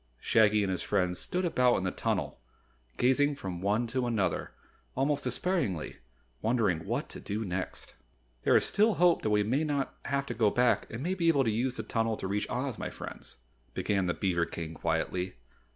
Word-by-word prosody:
Shaggy 105 - +4
and 95 - 0
his 90 - -2
friends 90 -3 0
stood 180 +1 -1
about 125 -7 +3
in - - -1
the 95 - 0
tunnel - - -2 0.6
gazing 145 +3 +3
from 95 -10 -6
one 105 +5 +1
to 125 +1 -1
another, 100 -7 0 0.5
almost 140 +2 +1
despairingly, 125 - -1 0.4
wondering 110 -8 +1
what - - -1
to - - -9
do 105 +2 -3
next. 95 0 -4 0.5
"There - - +5
is - - +2
still 215 +2 +3
hope 175 0 +4
that 110 - 0
we 105 0 +3
may 130 +9 +1
not 145 -3 -1
have 140 0 0
to - - -4
go 110 -3 +3
back 125 +2 +2
and 115 +4 -5
may 180 +3 0
be 175 -3 0
able 145 -5 +4
to 115 - +1
use 125 +4 -1
the - - -3
tunnel 115 -1 0
to - - -4
reach 105 +2 -1
Oz, 125 -1 -2
my - - -3
friends," - - -9 0.4
began 95 -3 0
the 85 - 0
beaver 85 -3 0
King 80 -1 -6
quietly. 85 +3 -1
115 Hz, 195 wpm, -30 LUFS, 95-135 Hz, 0.6 s, There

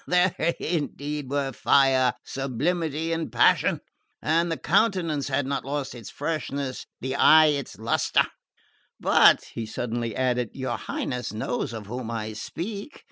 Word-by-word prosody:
There 180 0 +3 0.3
indeed 150 -3 -3
were 140 -1 -1
fire, 130 0 +3
sublimity 155 +4 -1
and 165 0 -3
passion! - - +3 0.4
And 165 +2 +1
the 165 - -1
countenance 170 -7 +1
had 140 0 0
not 140 0 -2
lost 140 0 -3
its 120 -4 -9
freshness, 140 -3 -3
the 130 +1 -2
eye 155 +2 +7
its 140 -8 -5
lustre. 110 +2 +2 0.7
But," - - +5
he 115 -1 -4
suddenly 115 0 -3
added, 125 -3 0
"your 130 -1 -2
Highness 125 -4 -4
knows 110 +2 -2
of 110 -3 -7
whom 120 +2 -5
I 110 -2 -4
speak. 200 - -6
140 Hz, 135 wpm, -26 LUFS, 125-160 Hz, 0.7 s, eye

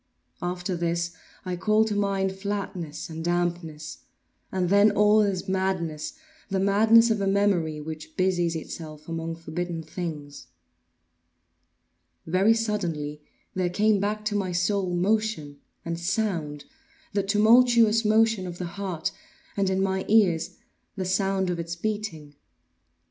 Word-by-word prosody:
After 180 +1 -2
this 170 0 -1 0.3
I 180 -1 -2
call 215 +4 +3
to 220 - -2
mind 195 -1 0
flatness 190 -5 -4
and 160 -1 -6
dampness; 170 -3 -2 0.5
and 185 -1 0
then 200 +2 +6
all 210 +1 +4
is 195 -3 -1
madness—the 190 - -3
madness 220 +4 +5
of 215 -2 0
a 195 - 0
memory 195 -6 +1
which 155 +1 -8
busies 175 -3 +1
itself 155 -1 -7
among 165 0 -4
forbidden 165 +1 -4
things. 150 -3 -6 1.8
Very 190 +7 +3
suddenly 170 -10 -2 0.3
there 185 -1 0
came 210 +3 +2
back 210 +2 -2
to 210 - 0
my 195 -3 -1
soul 185 +2 0
motion 190 -6 0 0.3
and 170 0 -3
sound—the 205 - -3
tumultuous 225 +2 +5
motion 220 -2 +3
of 175 -1 -7
the 180 - -4 0.2
heart, 180 -5 -2 0.4
and, 195 -2 +1
in 190 0 +1
my 190 -1 0
ears, 195 -7 +3 0.4
the 190 -2 -3
sound 190 0 +1
of 175 - -3
its 170 0 -4
beating. 180 -6 -4
190 Hz, 125 wpm, -26 LUFS, 170-210 Hz, 1.8 s, then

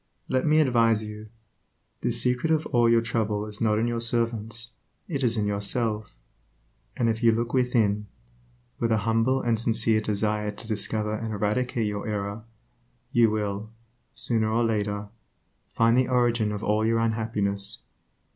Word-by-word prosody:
Let 130 +3 0
me 155 +1 +4
advise 115 -6 +3
you. 105 0 -8 0.7
The - - 0
secret 125 +6 +1
of 160 -1 +2
all 120 -3 +3
your 115 0 +4
trouble 105 -2 -1
is 105 -1 -7
not 105 -2 +2
in 110 - +1
your 120 -1 -1
servants, 115 0 -1 0.4
it 140 -6 -3
is 115 -2 +1
in 105 - +1
yourself; 105 - -1 0.8
and 120 - +1
if 115 0 0
you 115 -1 +5
look 115 +2 -2
within, 115 -5 +1 0.7
with 115 - 0
a 110 - +4
humble 115 +4 +2
and 115 -2 +1
sincere 110 -1 +2
desire 105 0 -1
to 105 +2 -8
discover 105 0 -1
and 110 +1 -4
eradicate 110 +3 -1
your 105 0 -3
error, 105 +1 -4 0.7
you 115 -2 +4
will, 105 0 -3 0.5
sooner 110 -2 +2
or 115 +2 +1
later, 105 -2 -1 0.7
find 115 +1 +4
the 130 0 +3
origin 120 -4 +2
of 105 0 -5
all 105 +1 +1
your 115 +1 +2
unhappiness. 110 -3 -1
110 Hz, 155 wpm, -26 LUFS, 105-120 Hz, 0.8 s, you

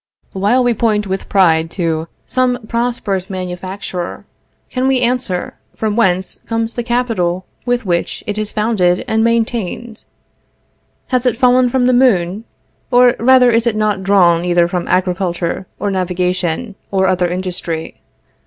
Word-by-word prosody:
While 205 +7 +2
we 245 -1 +2
point 215 -2 +1
with 190 0 -4
pride 165 -4 +3
to 165 -2 -1 0.2
some 250 -2 0
prosperous 230 -6 -2
manufacture, 185 0 -5 0.5
can 255 0 0
we 265 -1 +3
answer, 240 -7 -1 0.2
from 215 -2 -1
whence 190 -5 +1
comes 225 0 -1
the 240 - -2
capital 230 -7 -1 0.2
with 245 -1 0
which 175 -2 -1
it 210 -2 -3
is 215 -1 -3
founded 210 -5 +1
and 220 0 +1
maintained? 230 -1 -2 1.0
Has 255 -1 +1
it 235 - +1
fallen 250 0 +4
from 250 0 +1
the 255 - +3
moon? 215 -5 +2 0.4
or 245 -1 +5
rather 250 0 +5
is 230 +1 +2
it 230 - +1
not 210 -2 0
drawn 180 -4 +4
either 175 -1 +3
from 175 0 -3
agriculture, 180 -1 -1
or 205 - -2
navigation, 180 +2 -1 0.2
or 190 -1 +1
other 185 -1 +2
industry? 175 -2 -4
205 Hz, 145 wpm, -16 LUFS, 180-240 Hz, 1.0 s, or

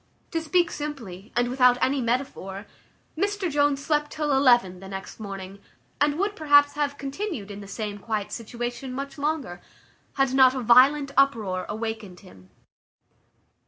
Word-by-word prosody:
To 330 - -1
speak 340 +2 +2
simply, 230 -10 -7
and 245 0 +2
without 250 0 +4
any 270 +1 +1
metaphor, 230 -5 -3 0.5
Mr 400 0 -1
Jones 285 -1 +1
slept 295 -1 +1
till 300 -1 -2
eleven 240 -9 +4
the 195 - -10
next 195 +2 -8
morning, 195 -2 -7 0.4
and 290 0 +2
would, 405 +3 -1
perhaps, 290 -2 +5
have 290 -1 -2
continued 275 - -5
in 200 - -8
the 200 - -10
same 205 0 -5
quiet 215 -1 -3
situation 240 +3 -5
much 275 +2 -6
longer, 285 - -2 0.5
had 270 -1 +1
not 260 -1 +6
a 260 - -2
violent 270 +5 +5
uproar 215 -10 +1
awakened 220 -4 -5
him. 95 - -17
255 Hz, 150 wpm, -25 LUFS, 210-290 Hz, 0.5 s, not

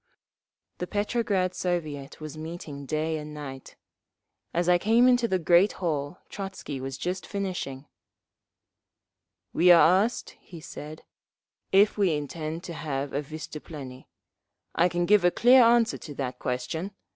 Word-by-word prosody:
The 180 - -3
Petrograd 205 -3 0
Soviet 155 -7 -3
was 155 -1 -7
meeting 155 -3 -7
day 155 +1 -1
and 150 0 -8
night. 135 -3 -8 0.8
As 175 +1 0
I 180 0 +5
came 230 +6 +4
into 245 -2 +4
the 190 - +1
great 175 +3 +4
hall 155 -1 -3
Trotzky 185 -9 -6
was 135 0 -5
just 185 +4 -3
finishing. 180 -9 -4 1.7
"We 180 +1 +6
are 175 +3 +7
asked," 235 +2 -4
he 170 - -12
said, 155 0 -9 0.7
"if 205 +2 +4
we 185 -6 +3
intend 155 +3 -5
to 170 - -6
have 140 -3 -4
a 145 - 0
vystuplennie. 150 -3 -9 0.7
I 175 +2 +3
can 175 0 0
give 205 0 +4
a 175 - +6
clear 250 +7 +6
answer 235 0 +3
to 145 -3 -9
that 130 -2 -4
question. 160 +10 -3
170 Hz, 140 wpm, -27 LUFS, 150-190 Hz, 1.7 s, are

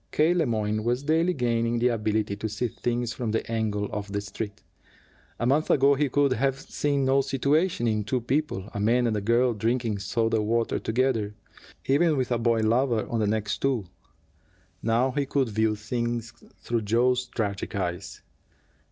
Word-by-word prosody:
K. 155 +3 +3
Le 170 -5 +1
Moyne 110 -1 -1
was 120 +3 0
daily 165 +4 +2
gaining 120 -2 0
the 120 +1 +3
ability 110 -2 -1
to 110 +2 -4
see 110 +4 -2
things 120 +1 -2
from 120 -3 -3
the 110 +1 -2
angle 105 -2 -1
of 105 -1 -5
the 100 - -1
Street. 100 0 -6 0.7
A 120 - -2
month 145 +5 +2
ago 140 +1 +5
he 140 0 +1
could 140 0 +2
have 135 +1 0
seen 140 -1 -1
no 135 +1 +4
situation 140 +1 +1
in 105 -1 0
two 125 +5 -1
people, 125 -5 -2
a - - -4
man 120 +4 +2
and 115 -2 +1
a 105 - -1
girl, 120 +4 +2
drinking 115 0 -1
soda 115 +3 0
water 115 +2 0
together, 110 -3 0 0.5
even 150 +3 +3
with 130 -1 -1
a 120 - +1
boy 115 -1 +2
lover 115 +1 +1
on 115 - -1
the 105 - +1
next 105 0 -1
stool. 130 -7 0 1.0
Now 120 +3 +2
he 140 +1 -1
could 135 -3 +1
view 110 0 +1
things 120 +1 -3 0.3
through 120 -1 -1
Joe's 125 +4 +2
tragic 105 -6 -3
eyes. 90 -1 -4
115 Hz, 180 wpm, -26 LUFS, 110-130 Hz, 1.0 s, ago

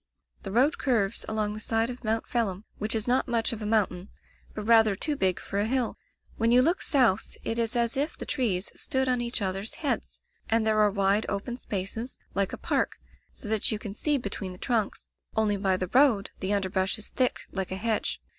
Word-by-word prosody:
"The 195 - -6
road 265 - +3
curves 225 -8 +1
along 215 -1 0
the 215 - -6
side 225 +2 0
of 250 +1 -10
Mount 220 0 0
Phelim, 215 -4 -1
which 215 +2 -1
is 220 +1 0
not 250 +2 +2
much 235 -1 +1
of 225 - -6
a 210 - -3
mountain, 200 -4 0 0.5
but 215 - -4
rather 220 -2 +5
too 295 +9 0
big 190 -8 +1
for 200 - -3
a 205 - +2
hill. 250 -1 0 0.4
When 230 0 +2
you 250 +1 +6
look 340 +5 +2
south 245 - +2
it 225 +1 -1
is 230 0 +1
as 235 -1 +1
if 285 +4 -1
the - - -6
trees 215 -9 0
stood 265 -2 0
on 250 -1 +1
each 235 -2 -2
others' 195 +3 -3
heads, 295 -4 -2 0.3
and 225 0 +2
there 215 -1 +3
are 210 -1 +5
wide, 200 +1 +2
open 210 +5 -3
spaces, 220 +2 -4 0.2
like 195 0 0
a - - -5
park, - - -1 0.3
so 225 - -10
that 220 +3 +2
you 215 - 0
can 210 -2 -7
see 295 +7 +1
between 200 -5 -5
the - - -11
trunks, 225 -1 -1 0.3
only 215 -2 +2
by 190 -2 +1
the 185 -1 -4
road 250 -7 +4
the 190 +1 -2
underbrush 190 -1 0
is 215 - -4
thick 255 -1 +1
like 190 -2 -3
a - - -1
hedge. 220 +1 -1
220 Hz, 215 wpm, -27 LUFS, 200-240 Hz, 0.5 s, you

